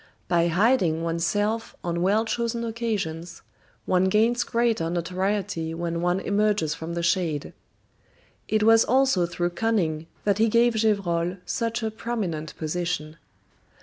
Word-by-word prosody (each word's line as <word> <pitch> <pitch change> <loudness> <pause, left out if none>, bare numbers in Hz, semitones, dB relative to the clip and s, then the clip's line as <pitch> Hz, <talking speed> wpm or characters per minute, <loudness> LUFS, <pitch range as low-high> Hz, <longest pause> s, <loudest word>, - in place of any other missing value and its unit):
By 170 -1 +2
hiding 175 -3 +2
one's 165 0 -1
self 210 +4 -1
on 170 0 -2
well 205 +5 +2
chosen 235 0 -2
occasions, 200 -8 -4 0.4
one 185 0 +2
gains 225 +5 +2
greater 230 -8 0
notoriety 180 -1 -2
when 170 0 -3
one 175 +1 +1
emerges 205 -5 +1
from 165 +2 -6
the 170 - -2
shade. 165 -4 0 0.9
It 215 -1 +1
was 225 +1 +6
also 260 -9 +2
through 175 0 -2
cunning 175 -6 -1 0.2
that 200 0 +1
he 225 +1 +4
gave 235 +2 +4
Gevrol 190 -5 0
such 230 0 -2
a 220 - -1
prominent 205 -9 -4
position. 160 -1 -3
190 Hz, 135 wpm, -25 LUFS, 170-225 Hz, 0.9 s, was